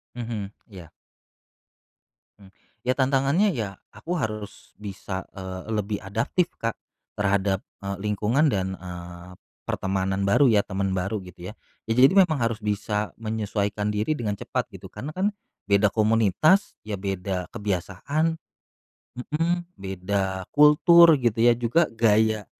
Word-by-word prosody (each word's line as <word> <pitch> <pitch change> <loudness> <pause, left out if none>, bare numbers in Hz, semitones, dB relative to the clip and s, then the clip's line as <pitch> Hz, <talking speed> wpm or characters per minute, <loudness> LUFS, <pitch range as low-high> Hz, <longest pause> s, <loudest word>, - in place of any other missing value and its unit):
Mhm, 110 -5 -4 0.2
iya. 90 -5 -11 1.5
Mmm. 95 -1 -17 0.3
Ya 130 - +3
tantangannya 135 +9 +2
ya 110 -4 -2 0.2
aku 175 - -6
harus 110 -4 -6
bisa, 100 -2 -6
eee, 95 -1 -6
lebih 105 0 -1
adaptif, 115 - -1
Kak, 115 -1 -2 0.4
terhadap, 100 -1 +1 0.2
eee, 100 -1 -4
lingkungan 105 +8 +1
dan, 95 -1 -1
eee, 90 0 -9 0.3
pertemanan 95 0 -1
baru 140 +8 +5
ya, 110 -5 +5
teman 95 -1 -2
baru 95 +4 -1
gitu 90 +1 -9
ya. - - -9 0.4
Jadi 125 +8 +5
memang 180 -6 +5
harus 115 -2 -1
bisa 105 0 -1
menyesuaikan 105 -2 -2
diri 105 +8 0
dengan 105 -7 -3
cepat - - -3
gitu - - -12
karena 145 - -6
kan 195 +6 -1 0.3
beda 100 +1 +3
komunitas 115 - +3
ya 105 - -5
beda 95 -1 -3
kebiasaan 105 - -2 0.8
mhm, 165 +7 -1
beda 95 0 -3
kultur 160 +2 +7
gitu 115 -3 0
ya 120 0 +5
juga 125 +8 +2
gaya 110 -2 +2
105 Hz, 125 wpm, -25 LUFS, 95-125 Hz, 1.5 s, kultur